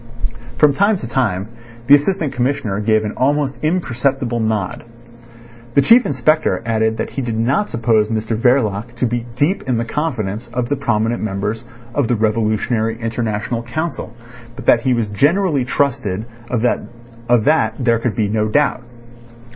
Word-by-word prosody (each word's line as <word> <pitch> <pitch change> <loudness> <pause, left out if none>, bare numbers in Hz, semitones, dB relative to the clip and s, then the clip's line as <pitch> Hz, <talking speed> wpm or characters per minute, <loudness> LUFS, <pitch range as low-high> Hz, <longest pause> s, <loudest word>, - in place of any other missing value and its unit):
From 150 -2 +5
time 200 +6 +2
to 125 - -7
time 110 -6 -1 0.4
the 135 - +6
Assistant 150 0 +3
Commissioner 125 -5 -1
gave 110 0 +2
an 105 - -3
almost 140 +1 +1
imperceptible 135 -6 0
nod. 110 -4 -2 0.9
The 140 - +5
Chief 235 +1 +6
Inspector 130 - +1
added 110 -1 +1
that - - -3
he 135 - -3
did 115 -3 -3
not 135 - +1
suppose 115 -2 +2
Mr 110 0 -2
Verloc 115 -2 +1
to 125 - 0
be 120 0 -2
deep 155 +10 +1
in 125 - +2
the 115 - -1
confidence 115 -6 -3
of 125 -1 -2
the 145 - +1
prominent 120 -3 0
members 105 +2 -3 0.3
of 140 -3 +1
the 120 - +1
Revolutionary 110 +1 0
International 115 0 -2
Council, 155 +8 -4 0.4
but - - -9
that 115 - +5
he 130 -1 +1
was 115 -2 0
generally 145 - +2
trusted 120 -7 -1 0.2
of 120 -2 -1 0.8
that 125 -7 +2
there 120 -3 +2
could 115 -3 -2
be 105 -1 +1
no 110 +1 0
doubt. 145 +1 +1
120 Hz, 155 wpm, -18 LUFS, 110-140 Hz, 0.9 s, the